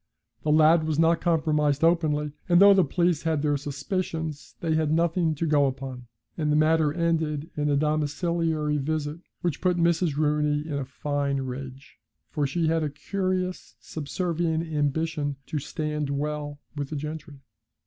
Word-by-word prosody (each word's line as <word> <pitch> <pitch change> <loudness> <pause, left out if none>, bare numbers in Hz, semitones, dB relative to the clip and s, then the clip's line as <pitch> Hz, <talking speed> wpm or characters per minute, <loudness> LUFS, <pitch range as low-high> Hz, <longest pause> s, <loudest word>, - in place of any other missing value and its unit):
The 150 - 0
lad 155 +1 +5
was 155 -2 0
not 165 +1 +3
compromised 150 -3 +1
openly; 155 -3 +2 0.2
and 175 0 +6
though 200 +1 +9
the 190 -1 +5
police 175 -3 +1
had 160 -3 0
their 145 -1 +2
suspicions, 155 +1 -4
they 165 -2 0
had 155 -1 +1
nothing 165 0 +2
to 165 - -2
go 145 -3 +3
upon, 130 -2 -6 0.3
and 150 -2 0
the - - +3
matter 155 0 +3
ended 160 -1 -1
in 150 0 0
a 145 - +2
domiciliary 155 0 0
visit 150 +2 -2 0.2
which 175 -5 -2
put 180 -1 +2
Mrs. 170 -3 +2
Rooney 150 -1 +1
in 155 - -4
a 135 - -3
fine 140 0 -2
rage, 130 +1 -8 0.3
for 145 -2 0
she 165 +4 -1
had 165 +1 +2
a 150 - -1
curious 185 +3 -3
subservient 165 +1 -2
ambition 150 0 -1
to 150 - -3
stand 150 0 -3
well 145 +1 -3 0.2
with 145 -2 -4
the 155 - -4
gentry. 150 0 -6
155 Hz, 160 wpm, -26 LUFS, 145-165 Hz, 0.3 s, though